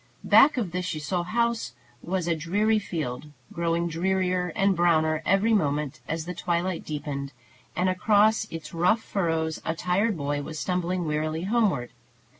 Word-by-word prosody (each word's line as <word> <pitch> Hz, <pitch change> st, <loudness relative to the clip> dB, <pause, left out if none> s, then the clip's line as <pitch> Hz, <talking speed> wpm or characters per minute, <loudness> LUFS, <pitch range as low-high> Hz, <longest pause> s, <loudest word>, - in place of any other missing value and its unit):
Back 280 Hz, 0 st, +6 dB
of 210 Hz, -8 st, -1 dB
the 180 Hz, +1 st, -2 dB
Ciseaux 175 Hz, 0 st, -2 dB
house 230 Hz, -, -1 dB, 0.3 s
was 180 Hz, -1 st, -2 dB
a 170 Hz, -, +2 dB
dreary 205 Hz, +7 st, +1 dB
field, 150 Hz, -8 st, -4 dB, 0.3 s
growing 170 Hz, 0 st, 0 dB
drearier 180 Hz, +1 st, 0 dB
and 195 Hz, 0 st, +3 dB
browner 160 Hz, -2 st, +2 dB
every 195 Hz, +5 st, +3 dB
moment 150 Hz, -7 st, 0 dB
as 160 Hz, 0 st, -3 dB
the 180 Hz, -, -4 dB
twilight 175 Hz, 0 st, -1 dB
deepened; 145 Hz, -2 st, -5 dB, 0.4 s
and 180 Hz, -, +1 dB
across 210 Hz, +4 st, +3 dB
its 155 Hz, -2 st, -8 dB
rough 180 Hz, +7 st, +2 dB
furrows 165 Hz, -4 st, -1 dB
a 165 Hz, -, -2 dB
tired 185 Hz, +4 st, 0 dB
boy 145 Hz, 0 st, -2 dB
was 155 Hz, +2 st, -7 dB
stumbling 180 Hz, 0 st, -1 dB
wearily 155 Hz, +1 st, -1 dB
homeward. 195 Hz, -, +1 dB
175 Hz, 150 wpm, -26 LUFS, 155-190 Hz, 0.4 s, Back